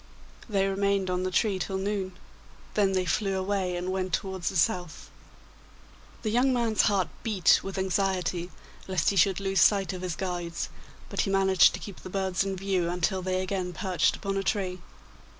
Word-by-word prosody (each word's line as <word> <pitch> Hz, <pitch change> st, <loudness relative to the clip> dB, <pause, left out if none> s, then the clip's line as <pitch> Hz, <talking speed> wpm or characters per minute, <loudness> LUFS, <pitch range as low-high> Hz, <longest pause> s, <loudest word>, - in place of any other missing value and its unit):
They 195 Hz, -2 st, +2 dB
remained 195 Hz, -1 st, 0 dB
on 180 Hz, 0 st, 0 dB
the 185 Hz, -, -1 dB
tree 195 Hz, +1 st, +1 dB
till 190 Hz, +1 st, -2 dB
noon; 190 Hz, -1 st, -2 dB, 0.6 s
then 200 Hz, -2 st, +2 dB
they 185 Hz, -1 st, +1 dB
flew 195 Hz, +1 st, 0 dB
away 190 Hz, -1 st, -1 dB
and 180 Hz, +1 st, -3 dB
went 185 Hz, -1 st, -2 dB
towards 190 Hz, -2 st, -1 dB
the -, -, -7 dB
south. 175 Hz, -1 st, 0 dB, 1.1 s
The 215 Hz, -, 0 dB
young 250 Hz, +4 st, +3 dB
man's 235 Hz, -3 st, +2 dB
heart 190 Hz, -5 st, +1 dB
beat 205 Hz, -7 st, +4 dB
with 195 Hz, 0 st, -6 dB
anxiety 185 Hz, -2 st, 0 dB, 0.4 s
lest 185 Hz, 0 st, +1 dB
he -, -, -3 dB
should 190 Hz, +1 st, +4 dB
lose 195 Hz, -1 st, +1 dB
sight 200 Hz, -2 st, +4 dB
of 180 Hz, -, -6 dB
his 180 Hz, -3 st, -3 dB
guides, 175 Hz, -1 st, -3 dB, 0.4 s
but -, -, -1 dB
he -, -, -1 dB
managed 190 Hz, -1 st, +5 dB
to -, -, -7 dB
keep 200 Hz, -, -9 dB
the -, -, -9 dB
birds 190 Hz, -1 st, 0 dB
in 195 Hz, -1 st, -2 dB
view 190 Hz, -2 st, 0 dB
until 180 Hz, +2 st, 0 dB
they 185 Hz, 0 st, -1 dB
again 185 Hz, -1 st, -3 dB
perched 180 Hz, -1 st, +1 dB
upon 195 Hz, -1 st, -3 dB
a 195 Hz, -, -1 dB
tree. 185 Hz, -3 st, -1 dB
190 Hz, 185 wpm, -28 LUFS, 180-195 Hz, 1.1 s, managed